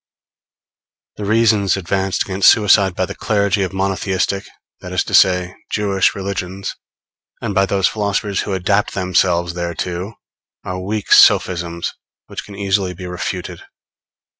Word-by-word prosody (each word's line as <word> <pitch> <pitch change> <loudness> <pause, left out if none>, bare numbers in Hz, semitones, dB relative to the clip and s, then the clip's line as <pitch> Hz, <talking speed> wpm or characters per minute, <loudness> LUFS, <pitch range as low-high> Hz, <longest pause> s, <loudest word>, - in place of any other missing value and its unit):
] - - -77
The 105 - -5
reasons 105 -3 +2
advanced 95 +1 -1
against 95 0 +4
suicide 100 -3 +4
by 95 - 0
the 100 - -7
clergy 100 -1 0
of 95 - -1
monotheistic, 95 0 -1 0.3
that - - -9
is - - +1
to - - -8
say, 90 -1 +4 0.2
Jewish 100 -2 +1
religions, 95 0 -4 0.6
and 105 - -3
by 95 0 +2
those 95 -1 +2
philosophers 100 -1 -1
who 100 - -4
adapt 100 +3 0
themselves 90 -2 +1
thereto, 90 +3 -4 0.5
are 90 0 -5
weak 105 +2 0
sophisms 85 -1 +3 0.3
which - - -7
can 100 - -12
easily 95 -2 -1
be 90 +1 -8
refuted. 90 0 -5
95 Hz, 140 wpm, -18 LUFS, 90-100 Hz, 0.6 s, against